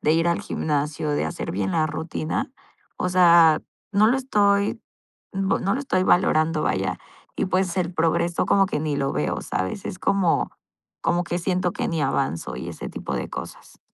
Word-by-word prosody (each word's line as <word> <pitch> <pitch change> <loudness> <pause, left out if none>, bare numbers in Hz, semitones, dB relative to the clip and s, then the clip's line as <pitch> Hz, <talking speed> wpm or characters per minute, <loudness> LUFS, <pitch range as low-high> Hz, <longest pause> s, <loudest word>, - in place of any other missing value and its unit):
de 155 - +3
ir 165 +1 +2
al 170 - +1
gimnasio, 150 0 -2
de 145 - 0
hacer 80 - -4
bien 95 0 -2
la 155 -1 +2
rutina. 160 - -3 0.4
O 180 - -1
sea, 170 -3 +6 0.3
no 210 +1 +4
lo 250 +4 +3
estoy, 205 -6 +2 0.5
mm, 195 0 -1
p - - +1
no 195 +2 +1
lo 275 - -2
estoy 185 -9 0
valorando, 160 -4 +3
vaya. 95 -1 -1 0.4
Y, - - 0
pues, 185 -1 0
el 180 -1 0
progreso 170 +1 +1
como 195 -1 +4
que 150 - -2
ni 150 -2 -1
lo 135 0 -1
veo, 75 - -1
¿sabes? 95 - -3
Es 180 - -5
como, 190 -4 +1 0.5
como 175 +1 +1
que 175 - -2
siento 180 -1 0
que - - -2
ni 165 -2 -1
avanzo 135 -12 -1
y - - -6
ese - - -6
tipo - - -5
de - - -3
cosas. - - -9
170 Hz, 190 wpm, -24 LUFS, 155-190 Hz, 0.5 s, sea